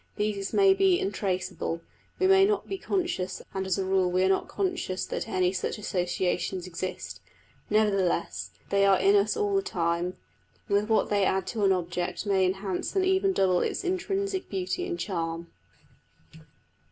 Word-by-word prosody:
These 205 -2 -2
may 395 -1 +5
be 385 -2 +3
untraceable: 185 - -2 0.4
we 375 - +1
may 385 0 +6
not 410 0 +1
be 390 -1 -4
conscious 350 - -2
and 190 -1 -2
as 185 - +1
a 195 - -1
rule 190 -1 +2
we 185 +1 +2
are 190 - +3
not 190 - +1
conscious 355 - -2
that - - -4
any 185 -1 +2
such 185 - -2
associations 185 -2 -1
exist; 170 - -6 0.5
nevertheless 190 - +1 0.2
they 200 0 +3
are 195 -1 +5
in 195 +2 +4
us 205 +1 +2
all 410 -1 0
the 390 - +3
time, 175 - -1 0.5
and 200 - +1
with 210 +2 +1
what 220 - +2
they 205 -1 +3
add 190 -1 +1
to 220 -4 -3
an 195 - +5
object 175 +1 -2
may 190 -2 +3
enhance 190 - -3
and 380 -1 +3
even 380 +1 +3
double 185 - +2
its - - -2
intrinsic 385 +1 -2
beauty 190 - -2
and 350 -2 -3
charm. 170 -3 -3
195 Hz, 170 wpm, -27 LUFS, -, 0.5 s, may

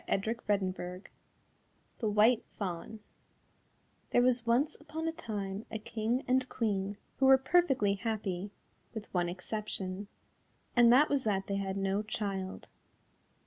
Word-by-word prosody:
"] - - -30
THE 195 -4 -1 1.0
WHITE 215 +3 +4
FAWN 195 +3 -5 1.1
There 245 - +4
was 245 -2 +2
once 250 +6 +2
upon 315 +2 -5
a - - +1
time 205 -7 -5
a 220 - -3
King 225 +3 -2
and 255 +1 +2
Queen 200 -3 -1 0.2
who 270 - +4
were 265 0 +9
perfectly 265 - +3
happy, 200 -3 -3 0.5
with 220 -1 -7
one 175 -1 +1
exception, 190 +1 -4 0.7
and 240 -1 +7
that 275 +5 +7
was 280 -2 +1
that 195 -2 +1
they 200 - -2
had 195 0 -2
no 195 +1 0
child. 200 -3 -4
215 Hz, 130 wpm, -32 LUFS, 195-245 Hz, 1.1 s, were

